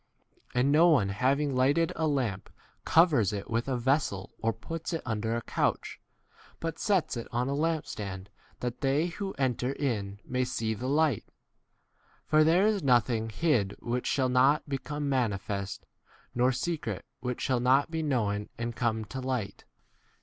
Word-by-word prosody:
And 125 +3 +3
no 165 +4 +6
one 110 -12 +4
having 135 +7 +1
lighted 140 +6 +2
a 160 0 0
lamp 125 -10 -1 0.4
covers 155 - +4
it 100 +1 -5
with 115 +2 0
a 130 -2 0
vessel 125 -6 0
or 115 - +1
puts 165 - -6
it 165 - -2
under 110 0 -1
a 120 - -3
couch, - - -1 0.6
but 165 -1 -4
sets 190 -10 +1
it 115 - -5
on 120 +2 0
a 140 - -1
lamp 160 +1 0
stand 95 -2 -6 0.3
that 125 -1 -4
they 140 +4 +2
who 195 +3 -4
enter 130 -1 -1
in 105 -9 -2
V 100 - -23
may 125 0 0
see 110 -3 -1
the 120 +4 -5
light. 145 -4 +2 1.0
For 155 0 +4
there 170 +5 +4
is 215 -2 +2
nothing 120 -4 +2
hid 110 -7 +1
which 120 +1 -2
shall 130 -2 +1
not 135 +5 +3
be 135 -1 -2
come 145 +1 -4
manifest, 100 -6 -2 0.5
nor 125 +2 +3
secret 165 +5 -3
which 125 -1 -3
shall 130 -2 +1
not 135 +5 +3
be 160 -1 -1
known 105 -8 -1
and 115 0 -3
come 110 -2 -1
to 130 +6 -6
18 - - -6
light. 125 -6 -3
130 Hz, 170 wpm, -29 LUFS, 115-150 Hz, 1.0 s, no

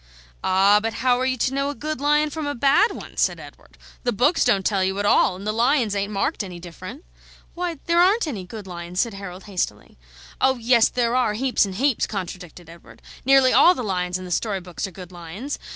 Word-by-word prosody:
"Ah, 195 +2 +4
but 225 0 -3
how 250 -1 +4
are 260 - 0
you 260 -1 -1
to 260 +2 0
know 275 +1 -1
a 290 - -5
good 305 -2 -5
lion 300 +1 +2
from 310 -1 -4
a 290 - -3
bad 285 - +3
one?" - - -10
said - - +1
Edward. - - -15 0.2
"The 245 - 0
books 255 - +2
don't 200 -6 +2
tell 195 -3 +1
you 190 +1 -1
at 205 - -1
all, 195 - +3
and 195 +2 -9
the 215 - 0
lions 235 -1 +1
ain't 200 +1 -2
marked 210 +5 -1
any 180 -3 -8
different." 185 - -10 0.5
"Why, 350 -2 -3
there 340 0 +3
aren't 400 +5 +3
any 230 - -5
good 210 +2 -9
lions," 175 0 -6
said 230 0 0
Harold, 195 -1 -8
hastily. 190 - -4 0.4
"Oh 265 0 +3
yes, 235 0 +4
there 240 -1 0
are, 245 -5 +1
heaps 250 -1 +1
and 190 - -7
heaps," 265 +2 +1
contradicted 180 -3 -7
Edward. 170 +1 -16 0.2
"Nearly 270 -1 +5
all 360 - +6
the 250 - -4
lions 180 -3 -2
in 185 - -9
the 180 - -8
story 200 +2 -1
books 180 +1 -6
are - - -11
good 180 0 -11
lions. 180 - -7
220 Hz, 225 wpm, -23 LUFS, 185-270 Hz, 0.5 s, all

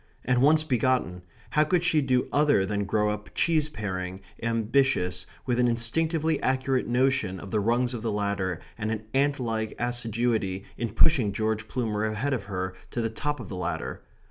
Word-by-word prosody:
and 125 0 +2
once 155 +3 +5
begotten, 125 -9 +1 0.3
how 150 - +4
could 175 +3 +1
she 165 -3 +3
do 130 -2 +1
other 145 -9 +4
than 100 0 -1
grow 105 +1 +1
up 105 0 -6
cheese 155 -3 +2
paring, 95 -7 -4 0.2
ambitious, 115 -5 +1 0.2
with 125 -1 0
an 125 - +4
instinctively 155 +7 +1
accurate 130 0 +1
notion 125 -6 +1
of 95 - -9
the 110 - +2
rungs 120 +4 +1
of 120 - -4
the 115 -1 -1
ladder 100 -4 -1 0.2
and 105 0 -1
an 110 -1 -3
ant 140 +1 +2
like 110 -3 -2
assiduity 115 -5 -1
in 120 - -2
pushing 115 0 +4
George 110 +1 -1
Plumer 110 -4 -1
ahead 110 +6 -1
of 110 -7 -2
her 95 -2 -3 0.2
to - - -4
the 115 -1 -1
top 145 +6 -2
of - - -7
the 100 - -6
ladder? 90 -2 -3
115 Hz, 180 wpm, -27 LUFS, 105-130 Hz, 0.3 s, once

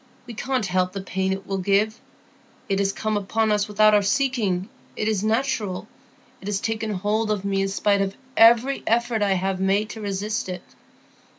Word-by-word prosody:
We 240 - -8
can't 255 0 -1
help 185 0 0
the 195 - -4
pain 190 0 -2
it 190 0 -4
will 195 -1 -2
give. 205 +4 +1 0.7
It 195 0 0
is 195 0 +1
come 215 +1 -2
upon 215 +2 0
us 210 -1 +1
without 215 +1 +4
our 205 - +5
seeking; 205 -5 0 0.3
it 215 - -2
is 215 -3 0
natural; 220 -4 -1 0.5
it 195 - -9
has 205 -1 0
taken 220 0 -2
hold 210 +2 -1
of 205 -2 -1
me 195 -1 0
in 195 - +1
spite 200 +1 +1
of 195 0 -2 0.2
every 235 +4 +5
effort 235 -1 +1
I 200 -2 +3
have 190 0 -1
made 200 +3 +1
to 220 - -8
resist 205 0 -3
it. 180 -1 -5
205 Hz, 190 wpm, -23 LUFS, 195-220 Hz, 0.7 s, our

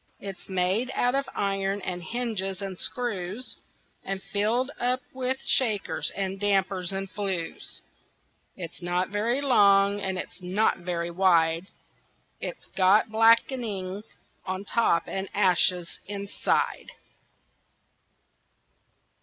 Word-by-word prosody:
It's 195 -2 -8
made 190 +6 +1
out 245 0 +2
of 275 0 0
iron 195 0 0
and 180 -1 -3
hinges 195 -3 -2
and 195 -2 -4
screws, 225 -1 -3 0.5
And 195 0 -3
filled 230 +6 +1
up 250 +1 +1
with 260 0 -1
shakers, 220 -6 +1
and 195 0 -2
dampers, 195 -2 +1
and 195 0 -3
flues. 190 -4 -4 0.8
It's 170 -1 -7
not 175 +1 0
very 225 +6 0
long 200 -6 +5
and 190 -1 -1
it's 185 - -6
not 185 +4 +1
very 175 -1 -2
wide; 170 -1 +3 0.7
It's - - -6
got 195 +4 +5
black'ning 220 -4 +2 0.4
on 185 +1 -4
top 215 -6 +2
and 195 0 -4
ashes 180 -3 +2
inside. 200 0 -1
195 Hz, 110 wpm, -27 LUFS, 185-220 Hz, 0.8 s, long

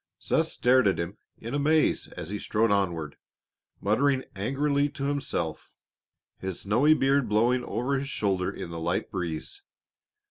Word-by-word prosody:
Seth - - +1
stared 125 -2 +3
at 95 - +2
him 85 +4 -3 0.2
in 115 +3 -7
amaze 150 +2 +2
as 80 - -5
he 105 +1 -3
strode 110 +2 +1
onward, 85 -7 0 0.6
muttering 130 +6 +2
angrily 140 +7 +1
to 140 - -7
himself, 140 - -2 0.7
his 95 -2 -4
snowy 130 +10 +4
beard 135 -4 +2
blowing 120 +4 +2
over 135 +3 -1
his 140 +1 -5
shoulder 95 -7 0
in 85 - -7
the 85 - -5
light 85 +2 -1
breeze. 85 - -4
115 Hz, 145 wpm, -27 LUFS, 95-140 Hz, 0.7 s, snowy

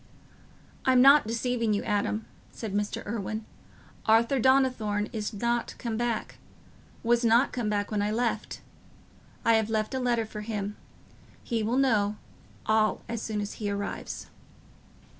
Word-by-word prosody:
"I'm 255 -1 +4
not 275 -1 +7
deceiving 230 -1 0
you, 205 - -2
Adam," 210 +1 -1 0.3
said 220 -4 -6
Mr. 205 0 -2
Irwine. 215 +1 -4 0.6
"Arthur 230 +4 +4
Donnithorne 245 -5 +2
is 215 -2 -3
not 235 +2 -1
come 230 -2 -3
back—was 235 +1 -3
not 235 +3 +4
come 240 -4 -2
back 205 0 -1
when 210 -1 0
I 205 - 0
left. 235 +2 -2 0.8
I 230 - +5
have 220 -1 +2
left 215 +1 -1
a 260 - -1
letter 240 -3 +1
for 215 -1 -7
him: 210 -1 -4 0.7
he 230 -3 -1
will 225 +4 0
know 215 -6 +2 0.5
all 215 0 +2
as 230 -1 -4
soon 215 -2 -2
as 205 - -4
he 205 - -1
arrives." 200 0 -4
220 Hz, 140 wpm, -28 LUFS, 210-240 Hz, 0.8 s, not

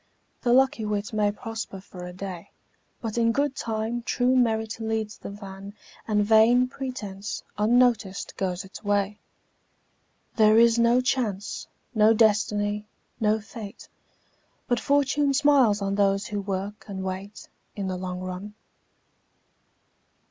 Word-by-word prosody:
The 240 - +1
lucky 265 -1 +4
wight 210 0 -2
may 210 -1 +2
prosper 225 -2 -6
for 180 -2 -10
a - - -7
day, 185 0 -7 0.5
But 225 0 -2
in 230 0 +3
good 280 +2 0
time 225 0 -2
true 250 +2 +1
merit 225 -3 +1
leads 220 -1 -3
the - - -7
van 200 0 -9 0.3
And 210 -2 +2
vain 225 +4 +5
pretence, 220 -7 -6
unnoticed, 225 -2 +2
goes 185 -1 -2
its 190 +3 -11
way. 205 0 0 1.2
There 215 -1 +6
is 235 0 +5
no 235 +2 +4
Chance, 220 -6 -2 0.3
no 220 0 +5
Destiny, 210 -1 +2 0.3
no 215 -1 +2
Fate, 215 0 -10 0.8
But 245 -1 +1
Fortune 280 +2 +2
smiles 260 -8 +4
on 195 0 -1
those 200 0 +2
who 205 -1 -3
work 195 +1 -4
and 190 -2 -5
wait, 190 +2 -6 0.3
In 200 -2 -3
the 185 - -2
long 180 0 -5
run. 185 +3 -6
215 Hz, 135 wpm, -26 LUFS, 200-235 Hz, 1.2 s, There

